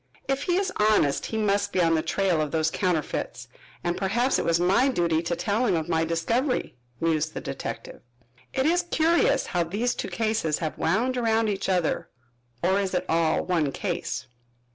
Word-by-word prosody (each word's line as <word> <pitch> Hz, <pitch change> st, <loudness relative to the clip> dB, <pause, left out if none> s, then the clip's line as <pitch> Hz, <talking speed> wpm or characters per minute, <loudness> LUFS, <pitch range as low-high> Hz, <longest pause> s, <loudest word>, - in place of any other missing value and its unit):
"If 270 Hz, 0 st, 0 dB
he 350 Hz, +4 st, 0 dB
is 390 Hz, -1 st, -1 dB
honest, 210 Hz, -10 st, +2 dB
he 220 Hz, -, -3 dB
must 205 Hz, -1 st, +1 dB
be -, -, 0 dB
on 165 Hz, -2 st, +3 dB
the 160 Hz, -, +2 dB
trail 180 Hz, -2 st, +1 dB
of 150 Hz, -, -1 dB
those 155 Hz, 0 st, 0 dB
counterfeits, 175 Hz, -6 st, -2 dB, 0.4 s
and 175 Hz, 0 st, 0 dB
perhaps 235 Hz, +7 st, +1 dB
it -, -, -2 dB
was 170 Hz, 0 st, +2 dB
my 195 Hz, +9 st, +3 dB
duty 170 Hz, -10 st, +1 dB
to 170 Hz, 0 st, -2 dB
tell 205 Hz, +7 st, 0 dB
him 190 Hz, -, +2 dB
of 160 Hz, -2 st, -2 dB
my 165 Hz, -1 st, +1 dB
discovery," 230 Hz, -, -1 dB, 0.2 s
mused 155 Hz, -1 st, 0 dB
the -, -, -2 dB
detective. -, -, -6 dB, 0.5 s
"It 265 Hz, -, 0 dB
is 345 Hz, +3 st, +3 dB
curious 330 Hz, +1 st, +3 dB
how 175 Hz, -2 st, 0 dB
these 210 Hz, +9 st, -1 dB
two -, -, -4 dB
cases 215 Hz, -9 st, 0 dB
have 155 Hz, -2 st, -3 dB
wound 240 Hz, +10 st, 0 dB
around 225 Hz, -2 st, +2 dB
each 195 Hz, -1 st, -2 dB
other, 180 Hz, -4 st, 0 dB, 0.5 s
or 190 Hz, +3 st, +3 dB
is 190 Hz, -2 st, -1 dB
it 180 Hz, +1 st, 0 dB
all 165 Hz, -1 st, +2 dB
one 165 Hz, -6 st, +1 dB
case?" -, -, -3 dB
185 Hz, 185 wpm, -26 LUFS, 165-225 Hz, 0.5 s, on